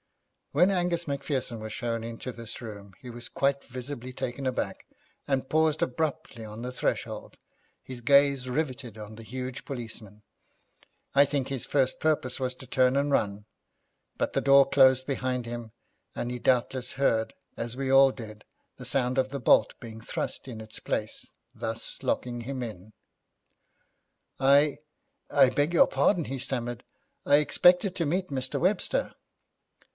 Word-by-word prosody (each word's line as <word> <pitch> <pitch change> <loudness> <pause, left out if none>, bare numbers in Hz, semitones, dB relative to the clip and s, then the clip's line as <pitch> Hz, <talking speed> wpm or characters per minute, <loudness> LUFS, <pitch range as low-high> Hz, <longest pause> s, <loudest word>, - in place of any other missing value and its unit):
When 175 +7 +4
Angus 175 -2 0
Macpherson 140 -4 -2
was 110 0 -6
shown 115 0 -2
into 115 +2 -6
this 115 -2 -8
room 100 -4 -9
he 125 - -10
was 120 0 -7
quite 140 0 0
visibly 130 0 -7
taken 130 +1 -4
aback, 130 - -3 0.4
and 135 -2 0
paused 155 0 +2
abruptly 150 -2 -2
on 110 +1 -8
the 125 0 -4
threshold, - - -3 0.5
his 125 -2 -7
gaze 140 0 +4
riveted 130 -5 -3
on 105 0 -9
the 115 - -10
huge 130 +3 -5
policeman. 110 -5 -8 0.9
I 140 - +8
think 140 -2 -1
his 135 -3 -3
first 135 -3 +1
purpose 145 -5 +1
was 130 -1 -1
to 130 - -12
turn 130 +1 +3
and 140 +1 +1
run, 105 -5 0 0.7
but - - -1
the - - +1
door 140 0 +6
closed 130 -1 +5
behind 130 -3 -2
him, 120 -1 -6 0.4
and 120 - -3
he 125 - -4
doubtless 125 0 +1
heard, 115 -5 +1 0.2
as 115 +1 -4
we 135 -1 -2
all 135 0 +7
did, 110 -4 -10 0.3
the 125 - -9
sound 125 +1 +1
of 130 0 +1
the 140 +1 -4
bolt 110 -3 +4
being 115 -1 -9
thrust 115 - -4
in 115 -3 -7
its 110 0 -8
place, - - -3 0.2
thus 115 0 -4
locking 120 -1 -1
him 130 +2 -5
in. 110 -3 -7 1.5
'I 140 +2 +4 0.5
I 140 -2 +6
beg 145 +4 +1
your - - +7
pardon,' 175 -6 +2
he 135 0 -4
stammered, 120 -2 -3 0.4
'I 145 - +5
expected 180 +5 +4
to 170 - 0
meet 185 +5 -1
Mr. 130 -2 -2
Webster.' 210 - +1
130 Hz, 155 wpm, -28 LUFS, 120-140 Hz, 1.5 s, I